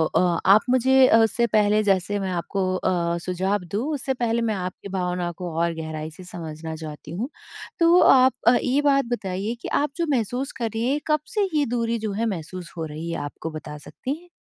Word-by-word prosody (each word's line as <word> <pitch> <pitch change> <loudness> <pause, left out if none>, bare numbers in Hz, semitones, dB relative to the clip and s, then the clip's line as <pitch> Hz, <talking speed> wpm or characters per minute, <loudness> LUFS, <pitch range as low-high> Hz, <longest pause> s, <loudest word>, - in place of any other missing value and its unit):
अ, 175 -2 +3
आप 210 +2 +8
मुझे 260 +1 +5
उससे 235 +1 +2
पहले 210 0 +3
जैसे 200 0 +1
मैं 190 -1 -2
आपको 185 +2 -2
अ, 170 -2 0
सुझाव 185 +2 -1
दूँ, 215 +6 -1
उससे 270 -1 -1
पहले 235 -2 0
मैं 220 -2 0
आपकी 185 +1 -6
भावनाओं 180 -2 -2
को 175 -3 -5
और 170 0 +1
गहराई 155 -1 -5
से 180 +4 -12
समझना 160 -2 -7
चाहती 155 -1 -8
हूँ। 220 - -3 0.5
तो, 340 +2 +6
आप 260 0 +6
अ, 245 - +7
ये 275 +3 +2
बात 275 -1 +3
बताइए 200 0 -2
कि - - -5
आप 295 - +1
जो 340 - +1
महसूस 245 +4 -2
कर 230 -2 -1
रही 230 +2 0
हैं, 290 +2 +1
कब 305 0 +3 0.2
से 405 -2 +2
ये 290 - +3
दूरी 230 -1 -1
जो 215 -1 -3
है, 225 +3 -1
महसूस 180 -3 -5
हो 160 - -2
रही 155 +2 -6
है 165 - -2
आपको, 155 +2 -6
बता 150 -1 -7
सकती 255 - -5
हैं? 355 - -20
200 Hz, 210 wpm, -24 LUFS, 170-245 Hz, 0.5 s, आप